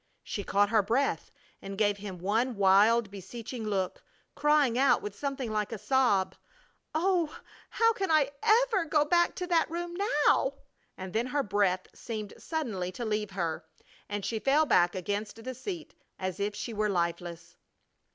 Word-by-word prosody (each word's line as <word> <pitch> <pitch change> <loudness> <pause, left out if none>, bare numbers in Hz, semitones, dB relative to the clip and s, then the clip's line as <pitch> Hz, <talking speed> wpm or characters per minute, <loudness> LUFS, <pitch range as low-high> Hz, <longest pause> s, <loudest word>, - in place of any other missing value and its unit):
She 205 - -4
caught 200 +1 +2
her 220 -2 +5
breath 235 +8 0 0.3
and 195 0 -7
gave 205 -1 +2
him 200 -2 -7
one 225 +7 0
wild, 200 +3 +4
beseeching 220 +4 -7
look, 190 -3 -2 0.3
crying 295 -5 +3
out 265 +1 +3
with 205 -1 -5
something 270 -1 -3
like 210 0 -1
a 225 - -3
sob: 210 -3 +2 0.6
"Oh, 340 -2 +1 0.3
how 455 0 +3
can 390 -3 -2
I 305 -3 +3
ever 445 -4 +3
go 300 -1 +2
back 345 +2 +3
to 360 - -3
that 335 -3 +2
room 345 +1 -4 0.3
now?" 270 +1 +3 0.4
And 185 -1 -7
then 230 +3 0
her 285 +2 0
breath 195 -3 +1
seemed 215 -3 -6
suddenly 220 - -3
to 240 - -5
leave 210 -1 -1
her 170 -5 -3 0.5
and 205 -1 -3
she 225 - -2
fell 280 +7 +3
back 175 -9 +3
against 205 +4 -4
the 260 +2 -4
seat 330 - -6 0.2
as 185 0 -4
if 205 +1 -1
she 220 +2 -5
were 210 0 0
lifeless. 170 -2 -3
220 Hz, 165 wpm, -29 LUFS, 200-290 Hz, 0.6 s, her